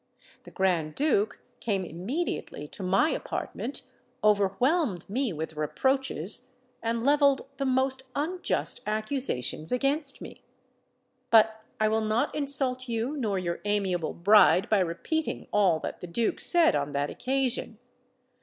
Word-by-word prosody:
The - - -10
Grand 175 -5 0
Duke 255 -8 +1 0.2
came 195 -5 -1
immediately 180 - -4
to - - -9
my 195 - +2
apartment, 260 +5 -4 0.4
overwhelmed 210 - +2
me 250 +3 -1
with 160 -1 -5
reproaches, 250 - 0 0.3
and 230 0 -1
levelled 285 -1 +3
the 275 -1 -1
most 260 0 +1
unjust 350 +6 -2
accusations 215 - -2
against 275 +3 0
me. - - -10 0.9
But 220 -1 +5 0.2
I 215 - +3
will 220 +1 +1
not 220 +6 0
insult 265 -3 +2
you 235 +5 -2
nor 220 -8 -1
your 175 -2 -3
amiable 195 -5 -1
bride 195 +2 +5
by 215 - +4
repeating 185 - -2
all 190 -6 +3
that - - -6
the 180 - -6
Duke 220 +6 -1
said 345 - +4
on 145 0 -2
that 140 +1 -1
occasion. 260 -4 -2
220 Hz, 130 wpm, -27 LUFS, 185-270 Hz, 0.9 s, But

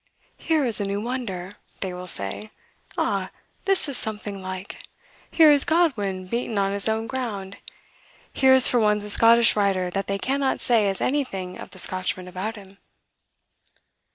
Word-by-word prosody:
'Here 315 -4 0
is 230 -4 0
a - - -1
new 200 +1 -2
wonder!' 210 -6 -5 0.3
they 190 -2 -3
will 180 0 -8
say. 165 - -2 0.5
'Ah, - - -1 0.4
this 390 -5 +1
is 280 - -4
something 210 -2 -5
like! 185 +1 -7 0.5
Here 315 -2 +6
is 285 -2 +6
Godwin 255 - 0
beaten 230 +2 -3
on 195 0 +1
his 200 +2 +1
own 220 +1 -1
ground... 215 -6 -5 0.8
Here 265 -1 +5
is 260 - +8
for 245 - +2
once 210 -1 +2
a 210 - -2
Scottish 230 +2 +5
writer 195 -3 0
that 195 +2 -3
they 200 - -1
cannot 270 +4 -1
say 225 -4 +2
has 195 -1 -2
anything 195 -10 -2
of - - -9
the - - -15
Scotchman 185 0 -1
about 190 +5 -5
him. 195 -1 -14
210 Hz, 165 wpm, -24 LUFS, 190-250 Hz, 0.8 s, is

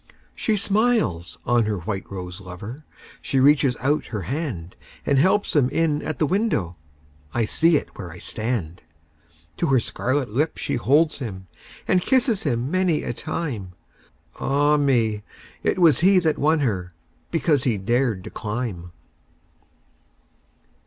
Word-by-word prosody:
She 220 - 0
smiles 200 - +1
on 120 -2 +3
her 105 -1 -1
white 95 +2 -5
rose 90 0 -6
lover, 100 - -9 0.4
She 135 - 0
reaches 140 -2 +4
out 145 +3 0
her 105 -5 -4
handAnd 105 - -4 0.4
helps 190 +8 +2
him 135 -4 +4
in 150 0 +1
at 155 - -4
the 155 - +2
window—I 85 - -3
see 165 +8 +3
it - - -5
where 90 -4 -7
I 85 - -10
stand! 105 -6 -3 0.8
To - - 0
her 135 -2 +4
scarlet 130 +1 -1
lip 150 +8 0
she - - -2
holds 150 +7 +2
him, 95 -8 -6 0.4
And 185 -1 +3
kisses 240 -2 +2
him 125 -1 -1
many 185 -4 +1
a - - -3
time—Ah, 140 - -3
me! 115 -7 +1 0.4
it - - 0
was 165 -7 +5
he 190 +3 +5
that 160 -4 +2
won 155 +1 +3
herBecause 120 - -2
he 120 -5 +1
dared 115 -1 0
to - - -9
climb! 105 -6 -4
125 Hz, 135 wpm, -23 LUFS, 95-155 Hz, 0.8 s, was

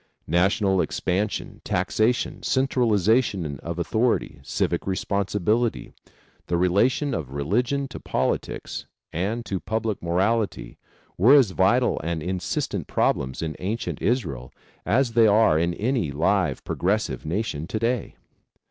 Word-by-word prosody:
National 95 +3 +2
expansion, 100 +4 -2
taxation, 115 +3 0
centralization 110 - +1
of 85 0 -5
authority, 110 - 0
civic 70 - -2
responsibility, 100 +4 0 0.5
the 85 - +1
relation 115 - +2
of 70 -5 -4
religion 120 - 0
to 130 - -8
politics 65 0 -2 0.3
and 105 +8 -2
to 95 - -2
public 110 0 -2
morality 100 +6 -1 0.4
were 120 +10 +7
as 130 -9 +5
vital 120 +7 +2
and 80 -1 -2
insistent 90 +1 -2
problems 65 +4 0
in 80 -2 -3
ancient 105 +5 -3
Israel 70 - -1 0.4
as 125 +1 +2
they 115 -1 +6
are 105 -7 +4
in 85 +1 0
any 115 - 0
live, 90 +5 +1
progressive 95 - -1
nation 80 -2 -3
to 110 - -3
day. 115 0 -1
100 Hz, 120 wpm, -24 LUFS, 85-115 Hz, 0.5 s, were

